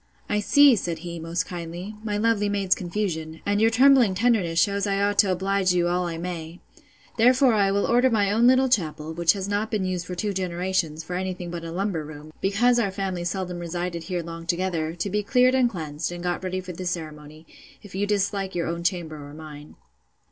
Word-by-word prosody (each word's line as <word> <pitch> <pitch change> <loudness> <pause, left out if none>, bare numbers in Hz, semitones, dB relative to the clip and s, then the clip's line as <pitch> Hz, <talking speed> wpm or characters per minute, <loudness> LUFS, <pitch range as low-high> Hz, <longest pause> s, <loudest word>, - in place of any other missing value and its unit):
I 210 - 0
see 285 +5 +6
(said 175 -5 -3
he, 170 -1 -5
most 165 +1 -2
kindly) 175 +3 -6
my 210 -2 -2
lovely 210 -1 +1
maid's 200 -2 +2
confusion; 170 -4 -3
and 205 +1 +1
your 225 - +5
trembling 250 -3 +5
tenderness 190 -6 +2
shews 200 +4 +1
I 195 0 0
ought 200 0 +1
to 200 -2 +5
oblige 190 0 +1
you 175 -1 +2
all 180 0 0
I 165 -1 -4
may. 170 -1 -6 0.6
Therefore 250 +2 +5
I 200 -2 +3
will 200 0 +1
order 245 +2 +3
my 205 -4 +2
own 230 +3 +4
little 260 +1 +5
chapel, 160 -9 -1
which 170 0 +3
has 195 -1 -4
not 205 +2 -1
been 205 -4 -1
used 180 -1 -3
for 180 - -5
two 205 +3 -2
generations, 180 -3 -2
for 180 +3 -5
any 185 0 -2
thing 175 -1 -7
but 170 -1 -6
a 165 - -6
lumber 185 -2 -2
room, 150 +1 -11
because 240 +5 +3
our 210 -4 +1
family 190 -2 -3
seldom 180 0 -3
resided 175 0 -4
here 175 0 -3
long 165 0 -8
together, 170 -2 -1
to 175 +4 -3
be 210 +1 +1
cleared 250 +4 +3
and 255 -2 +3
cleaned, 155 -6 -4
and 175 0 -7
got 175 +1 -2
ready 185 0 -2
for 185 -1 -8
the 180 +2 -5
ceremony, 155 -2 -6 0.4
if 205 - -13
you 200 +2 -1
dislike 200 -2 -1
your 170 - -1
own 170 +1 -3
chamber 170 -3 -2
or 145 +1 -11
mine. 150 -1 -11
185 Hz, 215 wpm, -24 LUFS, 170-205 Hz, 0.6 s, see